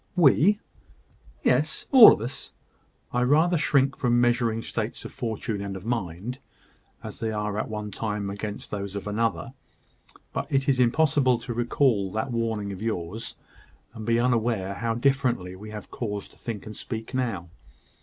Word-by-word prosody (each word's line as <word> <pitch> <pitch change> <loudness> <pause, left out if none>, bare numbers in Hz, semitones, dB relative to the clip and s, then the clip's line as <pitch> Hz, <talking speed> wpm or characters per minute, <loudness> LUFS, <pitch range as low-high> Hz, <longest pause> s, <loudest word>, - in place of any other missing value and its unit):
"We!" 180 +5 +5 0.8
"Yes; - - +1
all 255 -5 +11
of - - 0
us. 125 +5 -5 0.6
I 125 - +1
rather 155 +8 +4
shrink 140 -4 +2
from 120 -1 +2
measuring 120 -2 +2
states 110 0 -4
of - - -8
fortune 110 -3 -3
and 100 -1 -4
of 95 +1 -8
mind, 115 +1 -3 0.6
as - - -7
they 115 - -1
are 105 -1 -2
at - - -3
one 105 -1 -4
time 105 -2 -3
against 105 +1 -6
those 100 -1 -4
of 100 - -4
another; 115 +3 -1 0.8
but - - -3
it 135 0 +1
is 135 -2 +3
impossible 130 0 +3
to 120 +1 -5
recall 120 -4 +1
that 110 +4 -2
warning 110 -3 -1
of 95 0 -7
yours, 110 -1 -4 0.6
and 110 -2 -8
be 115 +1 +2
unaware 115 -5 +1
how 115 +2 -2
differently 120 -8 +1
we 105 +3 -10
have 105 -1 -8
cause 105 -4 -4
to - - -18
think 110 -4 -6
and 110 -1 -8
speak 115 0 -6
now. 110 -10 -2
115 Hz, 165 wpm, -26 LUFS, 105-125 Hz, 0.8 s, all